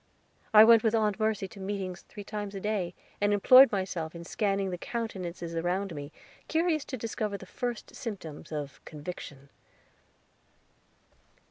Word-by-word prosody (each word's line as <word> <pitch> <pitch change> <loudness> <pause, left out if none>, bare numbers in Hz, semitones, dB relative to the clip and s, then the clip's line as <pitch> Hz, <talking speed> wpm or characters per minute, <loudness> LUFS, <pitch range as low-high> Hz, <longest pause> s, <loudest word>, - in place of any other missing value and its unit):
I 215 -1 +10
went 230 0 +8
with 225 0 +2
Aunt 215 -2 +1
Mercy 215 -3 0
to 200 - -12
meetings 190 -2 -4
three 205 - -10
times 205 -1 -5
a - - -3
day, 190 -4 -2 0.3
and 205 0 +3
employed 255 +6 +8
myself 180 -5 -2
in 170 - -7
scanning 195 +1 0
the 180 - -3
countenances 185 -8 -4
around 175 +3 -1
me, 145 0 -7 0.4
curious 320 -2 +1
to 260 - -5
discover 215 -2 -3
the 190 - -11
first 240 +4 -5
symptoms 180 - -7
of 145 -3 -5
Conviction. 145 -3 -8
200 Hz, 145 wpm, -29 LUFS, 175-220 Hz, 0.4 s, I